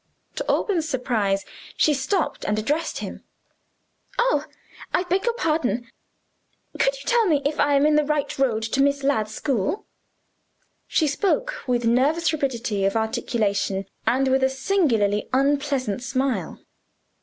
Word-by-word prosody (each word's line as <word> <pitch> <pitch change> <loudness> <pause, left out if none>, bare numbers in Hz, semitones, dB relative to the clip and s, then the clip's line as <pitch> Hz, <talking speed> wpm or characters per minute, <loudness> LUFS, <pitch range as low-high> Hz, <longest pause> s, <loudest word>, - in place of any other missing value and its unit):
To - - -2
Alban's 335 -6 +1
surprise 220 -7 0 0.3
she 305 - +4
stopped 300 +6 -1
and 210 - 0
addressed 295 +10 -1
him. - - -7 0.9
"Oh, 475 -12 +2 0.5
I 360 - +2
beg 370 +3 0
your 475 -1 +1
pardon. 290 - -1 0.9
Could - - +3
you - - -10
tell 470 -3 +3
me 305 -5 +3
if 290 +1 -1
I 290 -1 +3
am 280 +1 +4
in 300 0 +4
the 300 - +4
right 290 -1 -1
road 230 -5 +1
to 230 +5 0
Miss 280 0 +2
Ladd's 220 -6 0
school?" 275 - -1 1.0
She 320 - +2
spoke 410 - 0
with 245 -1 +1
nervous 285 +9 +2
rapidity 240 -8 -1
of 195 - +1
articulation, 205 -3 -1 0.2
and 265 +2 +3
with 265 0 +2
a 265 - +4
singularly 265 - +1
unpleasant 275 -4 +1
smile. 255 - -2
275 Hz, 145 wpm, -23 LUFS, 230-310 Hz, 1.0 s, she